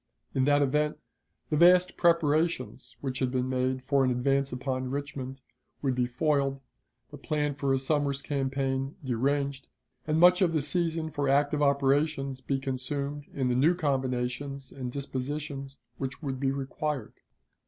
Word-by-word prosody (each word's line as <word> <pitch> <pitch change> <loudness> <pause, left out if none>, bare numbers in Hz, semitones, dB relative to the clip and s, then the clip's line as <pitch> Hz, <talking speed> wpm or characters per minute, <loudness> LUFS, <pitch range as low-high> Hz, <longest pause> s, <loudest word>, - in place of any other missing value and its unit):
In 130 - +2
that 145 0 +4
event, 150 +2 +1 0.5
the 150 - +2
vast 180 +2 +6
preparations 155 - +1
which 130 -2 -3
had 130 - +1
been 125 0 -1
made 130 0 0
for 140 0 +2
an 130 - +3
advance 135 +2 +1
upon 130 0 -2
Richmond 135 -1 -5 0.4
would 135 -2 +2
be 125 -1 +1
foiled, 135 +1 +1 0.5
the 145 - -9
plan 145 -1 -1
for 140 -1 -1
his 135 0 +1
summer's 140 -2 0
campaign 135 0 -1
deranged, 140 +2 0 0.4
and 155 +1 +2
much 180 +2 +7
of 175 -3 +3
the 155 - +2
season 165 0 -1
for 145 -3 -1
active 145 +2 +2
operations 140 -1 +2
be 135 +1 -1
consumed 140 +2 -3
in 130 -2 0
the - - +2
new 155 +8 +4
combinations 135 -2 -2
and 125 -2 -5
dispositions 140 +1 -4 0.2
which 135 +3 -5
would 135 -2 -3
be 135 0 +1
required. 140 +1 -3
140 Hz, 155 wpm, -29 LUFS, 130-145 Hz, 0.5 s, much